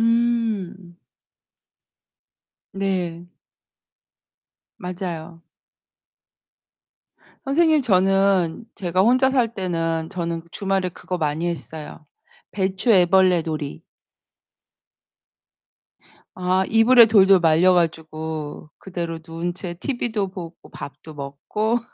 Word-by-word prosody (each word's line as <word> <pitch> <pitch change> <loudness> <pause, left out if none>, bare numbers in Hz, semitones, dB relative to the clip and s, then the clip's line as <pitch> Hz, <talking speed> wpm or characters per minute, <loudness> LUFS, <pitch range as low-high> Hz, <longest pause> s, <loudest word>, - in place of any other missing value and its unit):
음. 225 -6 0 1.8
네. 180 -4 -2 1.5
맞아요. 175 -2 -6 2.0
선생님 310 +2 +3
저는 195 -3 +2
제가 185 -2 0
혼자 255 +5 +4
살 245 -4 +1
때는 165 -4 -2
저는 170 -3 -4
주말에 195 -2 -1
그거 180 +1 -6
많이 155 0 -1
했어요. 155 -2 -7 0.5
배추 190 +3 -2
애벌레 185 -2 +4
놀이. 155 -3 -5 2.5
아, 185 +1 +1
이불에 230 +2 +7
돌돌 195 -3 +6
말려 165 +3 +4
가지고 160 -2 -3
그대로 170 -3 -5
누운 170 +1 -4
채 175 -1 -6
티비도 220 -2 -2
보고 175 -3 -8 0.2
밥도 155 +2 -10
먹고 150 +11 -2
185 Hz, 170 characters per minute, -22 LUFS, 165-200 Hz, 2.5 s, 이불에